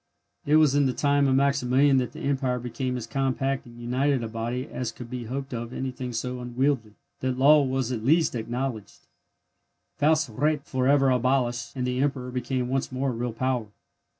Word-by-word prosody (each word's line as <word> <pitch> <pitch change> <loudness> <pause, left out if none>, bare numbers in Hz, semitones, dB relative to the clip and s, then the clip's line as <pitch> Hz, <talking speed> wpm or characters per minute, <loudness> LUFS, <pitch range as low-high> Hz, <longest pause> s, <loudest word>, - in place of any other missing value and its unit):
It 150 - +4
was 155 -3 +5
in 145 -1 +3
the 130 - 0
time 145 0 +2
of 130 - +3
Maximilian 140 0 +3
that 125 -1 0
the - - -10
Empire 135 -2 0
became 125 +1 -3
as 120 - -5
compact 135 +1 -1
and 120 0 -13
united 130 +2 0
a - - -2
body 120 +3 -3
as 125 -6 -4
could 120 0 -10
be 125 -2 -4
hoped 135 +3 -5
of 120 0 -4
anything 130 -1 -4
so 125 +2 -3
unwieldy, 125 -2 -1 0.2
that 130 -1 -1
law 145 +3 +6
was 130 -2 -1
at 115 -3 -3
least 160 +6 +3
acknowledged, 115 -7 -4 1.0
Faust 155 +2 +3
recht 145 +5 0
for 130 -1 -1
ever 135 -1 +4
abolished, 125 -1 0
and 125 -1 -2
the 125 0 -1
Emperor 135 -2 -1
became 125 0 -2
once 135 +1 -1
more 130 +1 -1
a - - -4
real 120 +1 -2
power. 125 -1 -1
130 Hz, 190 wpm, -26 LUFS, 120-135 Hz, 1.0 s, law